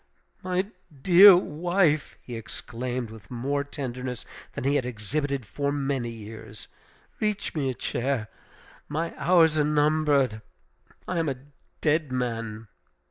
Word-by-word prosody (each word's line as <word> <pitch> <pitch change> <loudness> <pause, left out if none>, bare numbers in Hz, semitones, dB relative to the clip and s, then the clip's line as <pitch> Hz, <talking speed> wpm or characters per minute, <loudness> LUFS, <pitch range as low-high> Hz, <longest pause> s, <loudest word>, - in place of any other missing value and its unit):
"My 185 +1 0 0.4
dear 190 +1 +10
wife!" 175 -2 +1
he 120 - -7
exclaimed 120 +2 -5
with 110 -4 -13
more 140 +4 -1
tenderness 130 -3 -5 0.3
than - - -5
he 140 +2 +2
had 145 -3 +2
exhibited 125 +3 -3
for 140 +6 -2
many 135 -4 -1
years, 110 -1 -10 0.5
"Reach 210 -2 -1
me 140 -4 0
a 130 - -3
chair. 120 -3 -2 0.6
My 160 +3 -2
hours 165 -3 +4
are - - +4
numbered. 145 -6 +2 0.7
I 175 - -1
am 160 -2 +1
a 135 - -2 0.5
dead 155 -2 +1
man!" 115 -3 -3
140 Hz, 130 wpm, -26 LUFS, 120-155 Hz, 0.7 s, dear